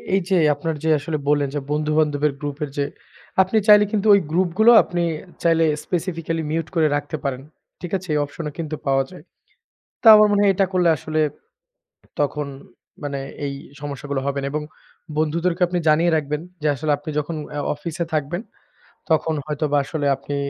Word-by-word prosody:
এই 195 - +2
যে, 190 - +3 0.2
আপনারা 165 -1 -3
যে, - - +2
আসলে 155 +2 -3
বললেন 145 -2 +2
যে, - - 0
বন্ধু 150 0 0
বান্ধবের 150 -1 +1
গ্রুপের 145 0 -4
যে 140 - +1 0.6
আপনি 190 +4 +1
চাইলে 210 0 +8
কিন্তু 215 0 0
ওই 200 - +6
গ্রুপ 180 +1 +2
গুলো 230 +2 +8
আপনি 175 -2 -2 0.4
চাইলে 165 -1 +4 0.2
স্পেসিফিকালি 165 -2 -2
মিউট 160 0 -1
করে 160 -2 +4
রাখতে 145 +2 -3
পারেন। 135 -2 -2 0.4
ঠিক 175 - -6
আছে? 185 0 -12
এই 150 - +2
অপশন 150 +3 -8
ও - - -10
কিন্তু 155 -1 -3
পাওয়া 135 0 +3
যায়। 180 -4 -12 0.8
তা 225 - +6
আমার 210 0 +6
মনে 205 - +3
হয় 200 - +5
এটা 195 +1 +2
করলে 180 -2 +3
আসলে 155 +2 -2 1.0
তখন 145 0 -1 0.6
মানে 140 -1 -3 0.3
এই 140 - -3 0.3
সমস্যাগুলো 140 -1 -4
হবে 140 0 -1
না। 140 - -3
এবং 150 - -1 0.6
বন্ধুদেরকে 165 +3 0
আপনি 180 0 -1
জানিয়ে 165 +3 +4
রাখবেন 150 0 -3 0.2
যে, 150 - 0
আসলে 150 +3 -1
আপনি 150 +2 -9
যখন 155 +2 -4 0.2
আ - - -1 0.2
অফিসে 170 +3 -4
থাকবেন, 155 +4 -1 0.7
তখন 160 0 +2
হয়তোবা 150 -1 -1
আসলে 145 0 -3
আপনি 145 +1 -5
155 Hz, 180 wpm, -22 LUFS, 145-175 Hz, 1.0 s, চাইলে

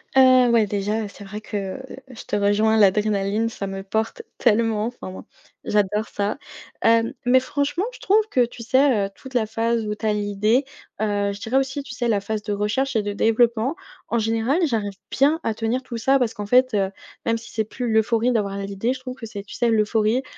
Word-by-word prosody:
Heu, 255 -2 +6
ouais, 225 -3 +4
déjà, 210 +2 -1
heu, - - -5
c'est 200 0 -12
vrai 210 +2 -7
que 205 +1 -5 0.3
je 240 - -10
te - - -2
rejoins 205 +2 +3
l'adrénaline, 210 +1 +2
ça 215 -3 -5
me 195 0 -5
porte 220 - -2 0.2
tellement! 220 0 +2
Enfin, 245 -6 -7
moi, 185 - -9 0.4
j'adore 210 +1 +1
ça. 205 +5 -2 0.4
Hem, 230 0 +3
mais 255 +1 +5
franchement 285 +8 -1
je - - -12
trouve 425 +2 +3
que 250 -8 +3
tu 235 0 -11
sais, 260 -4 +3
heu, - - -12
toute 265 -1 -12
la 225 -3 +3
phase 225 +1 -1
où 210 - -2
tu 220 - -7
as 215 - +3
l'idée, 210 +5 +1 0.4
heu, 205 -1 0
je 200 - -8
dirais 225 +5 -3
aussi, 270 +1 0
tu 245 - -9
sais, 240 -1 -1
la 210 - +2
phase 210 +1 -4
de 210 - -4
recherche 210 +6 -1
et 215 - +1
de 205 0 -3
développement, 230 +5 +2 0.3
en 235 - +1
général 225 +8 +1
j'arrive 215 -7 -1 0.2
bien 295 +5 +3
à 225 - 0
tenir 225 +4 -1
tout 240 -2 -6
ça 265 +5 +3
parce 240 -3 0
qu'en 205 - -5
fait, 255 +2 +4
heu, 195 -1 +1 0.3
même 230 0 +1
si 230 +1 -11
c'est 220 - 0
plus 240 +2 -4
l'euphorie 225 +2 +2
d'avoir 200 -3 -1
l'idée, 200 +4 -2
je 260 - -8
trouve 255 0 -7
que 245 - -8
c'est 200 -2 -7
tu 205 - -12
sais, 240 - +1
l'euphorie, 220 +3 +2
220 Hz, 220 wpm, -23 LUFS, 205-250 Hz, 0.4 s, Heu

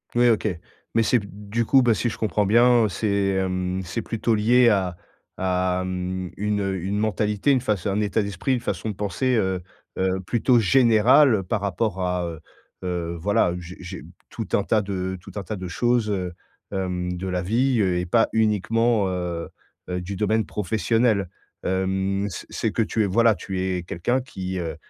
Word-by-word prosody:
Ouais, 120 0 +5
OK. 110 -1 +1 0.5
Mais, 115 - +4
c'est 120 +2 +3
b 100 - -9 0.2
du 115 0 +1
coup, 135 +1 +5
bah, 120 -2 +4
si 120 - -1
je - - -7
comprends 105 -2 0
bien, 120 +1 +5
heu, - - 0
c'est 105 +5 -2 0.2
hem, 95 -1 -1
c'est 85 - -3
plutôt 115 0 -1
lié 120 +3 +5
à 95 -4 0 0.4
à 90 0 0
mmh, 90 0 -3
une 105 0 0
heu, 95 -1 -1
une 100 +2 -1
mentalité, 105 +4 +1
une 130 -3 +3
faç... 105 -8 -1
un 100 +2 0
état 105 +1 +1
d'esprit, 100 +7 -2
une - - -2
façon 110 - -3
de 105 - -4
penser, 105 +6 0
heu 95 -3 0 0.4
heu, 95 0 +1
plutôt 120 +3 +3
générale 115 +1 +5
par 100 +3 -2
rapport 100 0 -1
à, 90 -1 -1
heu 80 -1 -6 0.4
heu, 85 -2 -3
voilà, 100 -2 +2
j'ai 90 +1 -10
j'ai 90 0 -8 0.3
tout 115 -5 -5
un 100 - +3
tas 110 0 +2
de 95 -2 -3
tout - - -12
un 100 - -4
tas 105 - -5
de 90 -1 -6
choses, 120 +2 +1
heu, 90 -3 -2 0.4
hem, 90 -2 -2
de 95 +2 -5
la 90 -1 -1
vie, 120 +5 +1
heu, 95 -3 +2
et 90 - -2
pas 115 +5 +3
uniquement, 110 0 +2
heu 90 -2 -3 0.4
heu, 90 0 -2
du 95 +2 -5
domaine 110 +1 +1
professionnel. 105 0 0 0.3
Hem, 95 +1 0
c'est - - -8
c'est - - -2
que 115 - 0
tu 110 0 0
es, - - +2
voilà, 115 +4 +4
tu 95 -1 -4
es 90 -2 -1
quelqu'un 105 +10 -1
qui, 95 -6 -5
heu, 85 -2 -4
100 Hz, 195 wpm, -24 LUFS, 90-110 Hz, 0.5 s, Ouais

